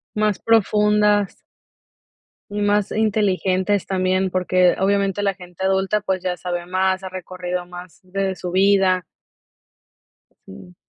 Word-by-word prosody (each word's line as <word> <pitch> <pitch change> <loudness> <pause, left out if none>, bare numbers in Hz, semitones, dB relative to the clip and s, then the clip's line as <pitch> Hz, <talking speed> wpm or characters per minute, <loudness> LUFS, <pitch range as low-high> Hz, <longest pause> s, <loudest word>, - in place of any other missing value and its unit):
Más 210 -2 +1
profundas. 210 -2 +2 1.1
Y 205 0 -3
más 205 0 +1
inteligentes 200 -2 +1
también, 185 0 0
porque 185 0 +2
obviamente 200 0 +1
la 200 -1 +1
gente 180 0 -9
adulta, 190 +2 +1
pues, 190 -3 -2
ya 180 -1 -2
sabe 175 -1 -4
más, 185 +1 0
ha 190 - -5
recorrido 180 -1 -5
más 180 -1 -12
de 190 +1 -2
su 180 - -5
vida. 190 -1 +3 1.4
Sí. 95 -2 -13
190 Hz, 120 wpm, -21 LUFS, 180-205 Hz, 1.4 s, vida